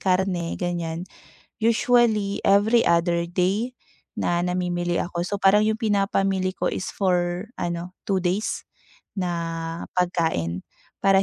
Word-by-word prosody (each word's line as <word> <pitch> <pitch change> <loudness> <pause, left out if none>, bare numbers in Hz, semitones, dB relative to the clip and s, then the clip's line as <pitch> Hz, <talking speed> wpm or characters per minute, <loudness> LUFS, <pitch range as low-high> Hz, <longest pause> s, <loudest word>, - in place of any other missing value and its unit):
karne 185 -2 +1
ganyan, 175 -1 -2 0.6
usually 225 -3 +3
every 210 +4 +4
other 170 0 +2
day 200 +8 0 0.4
na 175 0 +1
namimili 175 -1 -1
ako 175 -1 -2
so 205 - -3
parang 200 +2 +5
yung 220 0 +1
pinapamili 195 -3 +1
ko - - -2
is 185 - -3
for 180 0 0
ano 175 +1 -3
2 195 -2 +2
days 185 +4 -1 0.5
na 180 -3 -1 0.6
pagkain 160 - 0 0.4
para 195 -1 +5
185 Hz, 120 wpm, -24 LUFS, 175-200 Hz, 0.6 s, parang